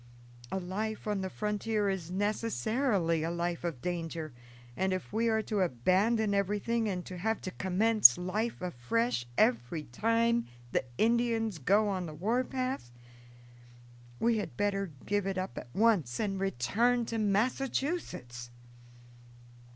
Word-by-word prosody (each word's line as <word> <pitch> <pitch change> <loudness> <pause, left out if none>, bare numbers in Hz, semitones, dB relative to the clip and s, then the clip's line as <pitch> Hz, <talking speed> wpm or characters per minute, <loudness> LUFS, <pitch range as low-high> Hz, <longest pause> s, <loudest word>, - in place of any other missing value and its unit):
A 190 - -1
life 210 +4 -4
on 210 -2 -1
the 190 - -3
frontier 210 +1 -1
is 190 -4 -2
necessarily 205 - 0
a 160 - -1
life 170 0 -2
of 165 -8 -4
danger, 165 -3 -3 0.4
and 190 0 0
if 185 - -5
we 230 +2 +1
are 220 -1 +1
to 210 -1 -2
abandon 190 - +2
everything 210 +3 0
and 180 -2 -3
to 180 -1 -7
have 220 +4 0
to 185 - -5
commence 190 - +6
life 190 +4 -2
afresh 180 - -1
every 125 +6 +2
time 230 - +1 0.2
the - - +1
Indians 225 -4 +1
go 200 +9 +3
on 185 -3 -2
the 155 - -8
war 225 +10 +1
path, 255 - -3 1.3
we 230 -1 +2
had 210 - -6
better 195 -2 0 0.2
give 205 -1 0
it 195 -1 -2
up 185 +1 -3
at - - -7
once 195 - +2
and 195 -3 -1
return 210 - +1
to 225 0 -3
Massachusetts." 210 - -1
200 Hz, 140 wpm, -31 LUFS, 175-225 Hz, 1.3 s, commence